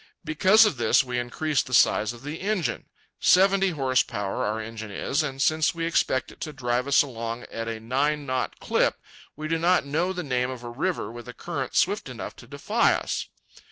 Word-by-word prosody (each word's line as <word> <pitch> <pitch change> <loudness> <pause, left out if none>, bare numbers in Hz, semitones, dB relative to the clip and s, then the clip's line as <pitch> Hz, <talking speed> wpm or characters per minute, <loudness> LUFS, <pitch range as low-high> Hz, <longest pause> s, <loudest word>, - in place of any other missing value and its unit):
Because 190 +8 +5
of 180 -10 0
this, 115 +1 +4
we 125 -1 -2
increased 135 +4 -1
the 130 - +1
size 110 -1 +4
of 120 +1 -12
the 150 +3 -6
engine. 185 - -2 0.3
Seventy 195 +1 +4
horse 135 -6 +2
power 100 -3 -3
our 105 +2 -1
engine 110 -1 -7
is, 135 - -1
and 135 -3 -4
since 155 +3 +2
we 165 0 -2
expect 145 -5 0
it - - -18
to 155 - -4
drive 125 -2 -1
us 140 - +5
along 115 -2 -5
at 115 0 -4
a 115 -1 -4
nine 140 +6 0
knot 130 -1 -2
clip, - - +1 0.4
we 155 +1 -5
do 165 +1 0
not 175 -1 +3
know 160 +6 0
the 180 -1 -4
name 125 -3 0
of 130 -2 -7
a 120 - -6
river 160 +3 -2
with 120 +1 -10
a 125 - -7
current - - -5
swift - - +1
enough - - -7
to - - -13
defy - - +1
us. - - -3
135 Hz, 205 wpm, -25 LUFS, 120-160 Hz, 0.4 s, Because